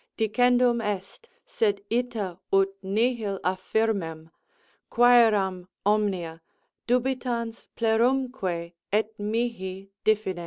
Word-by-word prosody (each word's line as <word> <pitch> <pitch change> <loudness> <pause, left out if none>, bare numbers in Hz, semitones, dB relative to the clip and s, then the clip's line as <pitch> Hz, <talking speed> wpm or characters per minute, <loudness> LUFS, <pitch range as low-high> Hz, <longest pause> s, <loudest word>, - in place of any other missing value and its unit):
_Dicendum 245 +1 +3
est, 205 - -5 0.2
sed 215 - 0
ita 225 -7 -2
ut 195 0 +4
nihil 210 0 0
affirment, 185 -4 -1 0.6
quceram 215 -7 +4 0.2
omnia, 190 -6 0 0.5
dubitans 245 -2 -1
plerumque, 225 -7 0 0.2
et 215 +1 +1
mihi 205 -3 -3
diffidens. 215 -4 +1
215 Hz, 80 wpm, -26 LUFS, 190-240 Hz, 0.6 s, ut